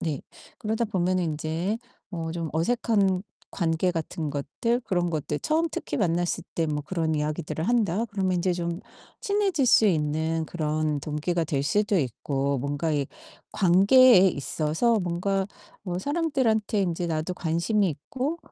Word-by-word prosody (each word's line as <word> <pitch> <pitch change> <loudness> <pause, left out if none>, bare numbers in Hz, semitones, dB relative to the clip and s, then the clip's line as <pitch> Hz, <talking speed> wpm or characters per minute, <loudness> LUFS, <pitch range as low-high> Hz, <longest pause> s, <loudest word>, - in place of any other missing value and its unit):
네. 155 -5 -2 0.4
그러다 225 +1 -1
보면은 185 -3 0
인제 160 +7 -2 0.3
어 165 -2 -3
좀 165 -2 -3
어색한 195 +1 +1 0.3
관계 170 0 +1
같은 160 -2 -3
것들 150 - -1
그런 175 -3 0
것들 150 -2 -2
'처음 320 +2 +1
특히 - - -3
만났을 175 -4 0
때 165 - 0
뭐 150 -1 -2
그런 160 -2 -1
이야기들을 150 +1 -2
한다.' 225 -3 +2
그러면 190 -2 0
인제 180 +1 +1
좀 170 0 -3 0.4
친해질 395 -9 +1
수 225 -2 +6
있는 160 -1 0
그런 155 -2 -1
동기가 155 +4 -1
될 140 -3 -1
수도 205 +4 +2
있고 140 +1 -1
뭔가 145 +4 -1
이 140 -2 0 0.5
관계에 200 +6 +6
있어서 165 - 0
뭔가 190 +2 -1 0.4
어 180 -1 -3
사람들한테 260 - +1
인제 175 -1 -1
나도 160 +2 -2
관심이 180 +5 +1
있고 260 - -4
175 Hz, 290 characters per minute, -26 LUFS, 155-210 Hz, 0.5 s, 수